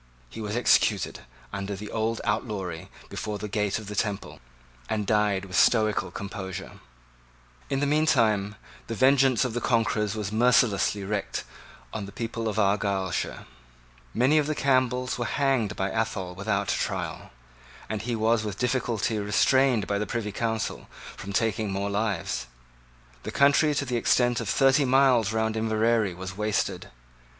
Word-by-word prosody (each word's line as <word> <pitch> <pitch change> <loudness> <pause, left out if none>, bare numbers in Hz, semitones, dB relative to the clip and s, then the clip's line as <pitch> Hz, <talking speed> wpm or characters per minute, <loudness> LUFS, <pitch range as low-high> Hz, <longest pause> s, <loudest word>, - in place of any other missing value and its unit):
He - - -7
was 105 0 -3
executed 120 - +2 0.3
under 100 0 -3
his 105 +2 -7
old 110 +1 -1
outlawry 105 -6 -3 0.2
before 105 -1 -4
the 105 - -5
gate 105 -1 0
of 110 - -7
the 105 +1 -6
Temple, 100 -1 -3 0.5
and 105 -2 -1
died 105 -2 +1
with 90 -2 -7
stoical 110 -4 +3
composure. 95 0 -7 0.9
In 135 - 0
the - - +2
meantime 115 -9 +2 0.3
the 115 - -4
vengeance 135 0 +4
of 125 - -3
the 120 - -2
conquerors 110 -3 +1
was 105 -2 -3
mercilessly 110 -3 +3
wreaked 100 0 -3 0.5
on 100 -2 -4
the - - -9
people 115 0 -4
of 110 - -2
Argyleshire. 100 -3 0 0.7
Many 135 +6 +3
of 150 - 0
the 155 - -1
Campbells 130 -2 +1
were 120 - -1
hanged 135 -6 0
by 95 +1 -1
Athol 110 -5 -2
without 100 +1 -1
a - - -2
trial; - - -3 0.6
and 110 -2 -3
he 120 0 -2
was 110 0 +2
with 105 -3 -4
difficulty 120 -3 0
restrained 110 +2 +3
by 100 0 -1
the 105 - -2
Privy 115 -3 -3
Council 110 +1 -3 0.3
from 100 - -7
taking 110 0 0
more 100 +1 -2
lives. 100 - -2 0.7
The - - -6
country 145 +2 +4
to 140 - 0
the 125 -2 -1
extent 120 0 +2
of 110 - -4
thirty 135 +4 +4
miles 130 -4 +4
round 110 0 0
Inverary 110 -2 +1
was 95 +1 -7
wasted. 105 0 -1
110 Hz, 155 wpm, -26 LUFS, 100-120 Hz, 0.9 s, vengeance